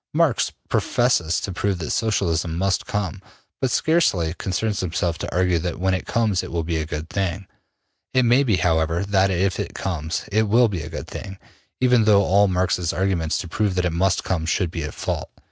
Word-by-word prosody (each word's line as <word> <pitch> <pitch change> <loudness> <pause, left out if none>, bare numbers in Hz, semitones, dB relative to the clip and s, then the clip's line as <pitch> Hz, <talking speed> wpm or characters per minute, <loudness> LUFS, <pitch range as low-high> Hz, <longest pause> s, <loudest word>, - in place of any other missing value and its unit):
Marx 160 -6 +2 0.2
professes 105 -9 +1
to 100 - -4
prove 95 +2 -1
that 80 -3 -4
Socialism 85 -7 0
must 95 +1 0
come, 100 -2 -3 0.4
but 130 - +2
scarcely 110 - +2
concerns 100 +3 -2
himself 85 -1 -1
to - - -4
argue 90 -1 +2
that 85 0 -4
when 95 +1 +1
it 95 - -3
comes 110 -5 +1
it - - -8
will 85 -1 -1
be 85 0 -2
a 80 -1 -3
good 80 0 -5
thing. 95 +1 -2 0.7
It 130 - +3
may 120 +3 +4
be, 120 -8 +2
however, 85 -1 +1
that 100 -1 +2
if 95 +1 0
it - - -4
comes, 85 -3 -3
it 110 +1 +2
will 120 +2 +5
be 90 -5 -3
a 75 - -7
good 80 - -6
thing, 95 -1 -8 0.4
even 125 -3 +4
though 100 -2 +5
all 100 +2 +4
Marx's 90 -2 0
arguments 85 -3 0
to - - -4
prove 100 +2 -1
that 90 -1 +1
it 85 - 0
must 95 +2 +1
come 80 -4 -2
should 85 0 0
be 85 - -4
at 75 -1 -5
fault. - - -3
95 Hz, 205 wpm, -22 LUFS, 85-105 Hz, 0.7 s, will